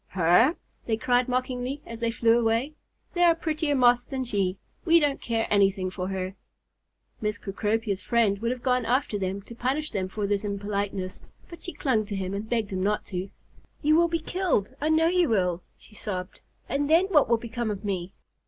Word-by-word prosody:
"Her!" 185 Hz, -, +4 dB, 0.3 s
they 220 Hz, -2 st, +1 dB
cried 245 Hz, +2 st, +2 dB
mockingly, 255 Hz, +2 st, -2 dB
as 230 Hz, -1 st, -8 dB
they 230 Hz, -1 st, 0 dB
flew 230 Hz, 0 st, +3 dB
away. 230 Hz, +6 st, +1 dB, 0.4 s
"There 350 Hz, -1 st, +4 dB
are 335 Hz, -, +5 dB
prettier 315 Hz, -2 st, -1 dB
Moths 245 Hz, -1 st, +4 dB
than 265 Hz, 0 st, -3 dB
she. 200 Hz, -6 st, -1 dB, 0.3 s
We 335 Hz, 0 st, +6 dB
don't 290 Hz, -3 st, 0 dB
care 225 Hz, -1 st, 0 dB
anything 195 Hz, -2 st, +2 dB
for 185 Hz, -1 st, -4 dB
her." 190 Hz, -1 st, -3 dB, 0.9 s
Miss 210 Hz, -1 st, -1 dB
Cecropia's 210 Hz, 0 st, -2 dB
friend 225 Hz, -4 st, +2 dB
would 230 Hz, +2 st, -1 dB
have 250 Hz, 0 st, -4 dB
gone 250 Hz, -1 st, +2 dB
after 240 Hz, -3 st, 0 dB
them 195 Hz, +1 st, -3 dB
to 235 Hz, -, -11 dB
punish 265 Hz, +6 st, -1 dB
them 190 Hz, -3 st, -2 dB
for 210 Hz, +1 st, -3 dB
this 200 Hz, 0 st, 0 dB
impoliteness, 200 Hz, -2 st, -3 dB, 0.3 s
but 340 Hz, -, -10 dB
she 355 Hz, -, -6 dB
clung 225 Hz, -7 st, 0 dB
to 205 Hz, -, -4 dB
him 190 Hz, 0 st, -3 dB
and 205 Hz, +2 st, -4 dB
begged 225 Hz, -4 st, -1 dB
him 185 Hz, -1 st, -2 dB
not 210 Hz, +2 st, 0 dB
to. 185 Hz, +2 st, -3 dB, 0.5 s
"You 305 Hz, +1 st, +5 dB
will 340 Hz, +1 st, +5 dB
be 335 Hz, 0 st, 0 dB
killed, 330 Hz, -, -1 dB
I 305 Hz, -, +1 dB
know 315 Hz, +1 st, +4 dB
you 350 Hz, -1 st, +3 dB
will," 180 Hz, -5 st, +1 dB, 0.2 s
she -, -, -19 dB
sobbed. 185 Hz, -3 st, -5 dB, 0.3 s
"And 285 Hz, +1 st, -1 dB
then 330 Hz, +4 st, +5 dB
what 295 Hz, -10 st, +4 dB
will 235 Hz, -, +4 dB
become 235 Hz, 0 st, -4 dB
of 205 Hz, 0 st, -4 dB
me?" 185 Hz, -2 st, -2 dB
225 Hz, 200 wpm, -26 LUFS, 200-270 Hz, 0.9 s, We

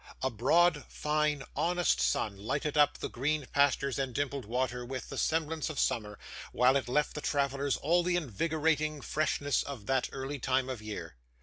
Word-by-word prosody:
A 130 Hz, -, +1 dB
broad, 150 Hz, +7 st, +3 dB
fine, 150 Hz, -1 st, 0 dB
honest 175 Hz, +1 st, +1 dB
sun 105 Hz, -2 st, +1 dB
lighted 140 Hz, +9 st, -2 dB
up 145 Hz, -1 st, +4 dB
the -, -, -4 dB
green 145 Hz, +3 st, -1 dB
pastures 140 Hz, -1 st, +2 dB
and 130 Hz, -3 st, -2 dB
dimpled 140 Hz, -3 st, -2 dB
water 125 Hz, +2 st, -1 dB
with 130 Hz, +1 st, -6 dB
the -, -, -6 dB
semblance 160 Hz, -1 st, 0 dB
of 155 Hz, -, -6 dB
summer, 105 Hz, -5 st, 0 dB, 0.3 s
while 125 Hz, +2 st, +4 dB
it 135 Hz, -3 st, 0 dB
left 150 Hz, +4 st, +1 dB
the 150 Hz, -, -5 dB
travellers 140 Hz, -1 st, 0 dB
all 170 Hz, +4 st, +2 dB
the 175 Hz, 0 st, 0 dB
invigorating 155 Hz, -, 0 dB
freshness 145 Hz, -2 st, 0 dB
of 130 Hz, -8 st, -7 dB
that 130 Hz, -1 st, +1 dB
early 135 Hz, +1 st, -5 dB
time 130 Hz, +1 st, 0 dB
of 125 Hz, -4 st, -4 dB
year. 90 Hz, -, -7 dB
140 Hz, 175 wpm, -31 LUFS, 130-150 Hz, 0.3 s, up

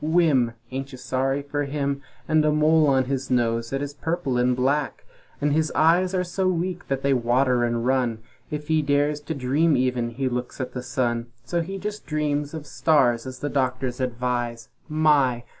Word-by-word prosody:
Whimm! 155 Hz, -7 st, +3 dB, 0.2 s
Ain't 135 Hz, +1 st, -4 dB
you 130 Hz, -, -9 dB
sorry 135 Hz, +2 st, -1 dB
for 145 Hz, 0 st, -2 dB
him? 140 Hz, -1 st, -2 dB, 0.3 s
And 155 Hz, -1 st, +3 dB
a 150 Hz, -, +3 dB
mole 155 Hz, +1 st, +4 dB
on 135 Hz, -2 st, +3 dB
his 135 Hz, 0 st, -3 dB
nose 115 Hz, -2 st, +1 dB
that 135 Hz, +1 st, -2 dB
is 145 Hz, 0 st, -5 dB
purple 160 Hz, -2 st, -2 dB
and 125 Hz, 0 st, +2 dB
black; 140 Hz, +4 st, 0 dB, 0.3 s
And 145 Hz, -1 st, +1 dB
his 155 Hz, 0 st, +1 dB
eyes 180 Hz, +4 st, +3 dB
are 180 Hz, -, +1 dB
so 185 Hz, +1 st, -1 dB
weak 180 Hz, 0 st, -2 dB
that 135 Hz, -1 st, -2 dB
they 140 Hz, 0 st, +3 dB
water 125 Hz, 0 st, +2 dB
and 120 Hz, 0 st, 0 dB
run 125 Hz, -3 st, +1 dB, 0.3 s
If 150 Hz, 0 st, -5 dB
he 160 Hz, -1 st, +3 dB
dares 145 Hz, +1 st, +1 dB
to 155 Hz, +2 st, -4 dB
dream 140 Hz, +4 st, +2 dB
even 125 Hz, -2 st, 0 dB
he 130 Hz, +3 st, -2 dB
looks 125 Hz, 0 st, -4 dB
at 130 Hz, -1 st, -4 dB
the 125 Hz, -, -4 dB
sun, 120 Hz, -2 st, -1 dB, 0.2 s
So 170 Hz, +6 st, 0 dB
he 190 Hz, +4 st, -5 dB
jes' 210 Hz, +2 st, -4 dB
dreams 150 Hz, -1 st, -2 dB
of 155 Hz, -2 st, -6 dB
stars, 135 Hz, -6 st, +2 dB
as 130 Hz, 0 st, -8 dB
the 145 Hz, -, -1 dB
doctors 130 Hz, -2 st, -1 dB
advise 120 Hz, -2 st, -2 dB, 0.2 s
My! 145 Hz, -6 st, +3 dB
140 Hz, 190 wpm, -24 LUFS, 125-155 Hz, 0.3 s, mole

